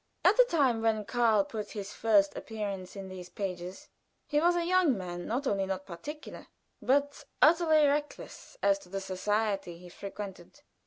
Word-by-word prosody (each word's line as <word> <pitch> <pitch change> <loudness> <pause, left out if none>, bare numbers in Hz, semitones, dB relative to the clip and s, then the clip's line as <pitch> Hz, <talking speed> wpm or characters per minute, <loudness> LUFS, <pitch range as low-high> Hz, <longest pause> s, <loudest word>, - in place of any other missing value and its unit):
At - - +6
the - - +7
time 270 - +2
when 220 -2 +1
Karl 230 -2 +3
put 210 +1 -6
in - - -3
his 195 0 -6
first 205 -3 +3
appearance 200 -4 -5
in 195 -1 -7
these 185 -1 -9
pages 180 -2 -6 0.4
he 295 0 +1
was 345 +1 +4
a 345 -1 0
young 355 - +3
man 175 -2 -6
not 255 +6 -1
only 195 -5 0
not 190 0 -3
particular, 295 - -8 0.3
but 285 +2 +1 0.2
utterly 315 -1 +5
reckless 295 +11 -3
as 295 0 +4
to 235 - -17
the 195 +1 -3
society 195 -1 -1
he 180 +1 -13
frequented. 200 +6 -9
215 Hz, 170 wpm, -30 LUFS, 190-285 Hz, 0.4 s, the